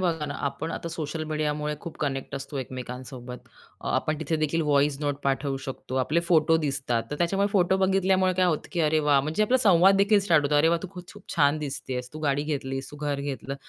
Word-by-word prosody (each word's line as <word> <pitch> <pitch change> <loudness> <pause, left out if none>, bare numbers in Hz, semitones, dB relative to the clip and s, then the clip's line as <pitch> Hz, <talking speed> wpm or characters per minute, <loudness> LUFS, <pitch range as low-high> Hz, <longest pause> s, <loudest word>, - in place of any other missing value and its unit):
बघा 165 -4 0
ना, 145 - -5
आपण 140 +4 -3
आता 170 - -5
सोशल 160 -1 -4
मीडियामुळे 150 0 -1
खूप 170 - -8
कनेक्ट 140 -1 -2
असतो 135 +1 -5
एकमेकांसोबत. 125 -1 -7 0.4
आपण 155 -1 -1
तिथे 160 0 -1
देखील 155 +1 0
व्हॉईस 140 -1 +3
नोट 145 -2 -1
पाठवू 135 0 0
शकतो. 130 -1 -6
आपले 150 +6 +1
फोटो 165 -2 +3
दिसतात, 135 -6 -1
तर 145 - -3
त्याच्यामुळे 195 +4 +1
फोटो 190 -1 +3
बघितल्यामुळे 190 -1 +2
काय 185 0 +3
होतं, 160 -4 -1
की 175 - 0
अरे, 155 0 +3
वाह! 140 -2 +5
म्हणजे 155 +9 0
आपला 250 +5 +3
संवाददेखील 200 0 +5
स्टार्ट 165 -6 +3
होतो. 150 - +1
अरे, 155 +2 +4
वाह! 170 0 +2
तू 190 - -5
खूप-खूप 180 +2 -11
छान 145 -1 +4
दिसतेस, 130 -3 -5
तू 155 - -7
गाडी 145 -1 +1
घेतलीस, 135 -3 -3
तू 145 - -10
घर 145 -1 -2
घेतलं. 140 -1 -4
150 Hz, 200 wpm, -26 LUFS, 140-170 Hz, 0.4 s, वाह